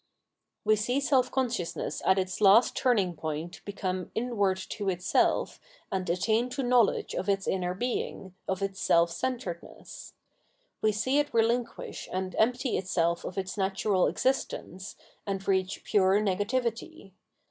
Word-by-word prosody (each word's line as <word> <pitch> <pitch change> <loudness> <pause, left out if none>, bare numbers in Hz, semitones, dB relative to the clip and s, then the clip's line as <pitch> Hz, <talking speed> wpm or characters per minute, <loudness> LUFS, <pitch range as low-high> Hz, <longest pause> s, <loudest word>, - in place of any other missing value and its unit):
We 215 0 +4
see 245 +6 0
self 270 -3 +2
consciousness 240 -10 -2
at 190 - +5
its 185 +1 -2
last 210 +4 +6
turning 210 -9 +2
point 160 +3 -5
become 185 -3 -3
inward 215 -5 +1
to 205 -2 -2
itself 180 -1 +1 0.3
and 190 -1 -2
attain 220 +7 +1
to 270 +2 -3
knowledge 245 -3 +2
of 190 - -2
its 195 -1 0
inner 180 -1 -1
being, 200 -4 -3
of 190 +1 -1
its 195 -1 -3
self 170 0 +4
centredness. 215 -5 -6 0.7
We 215 - +3
see 260 +7 +1
it 290 - 0
relinquish 230 +1 -1
and 185 -1 -3
empty 250 +3 +2
itself 170 -2 0
of 185 - -6
its 190 +1 -3
natural 195 0 +1
existence, 195 -7 -2 0.3
and 195 -1 -3
reach 190 -1 0
pture 195 0 +3
negativity. 230 - -2
200 Hz, 135 wpm, -28 LUFS, 185-240 Hz, 0.7 s, last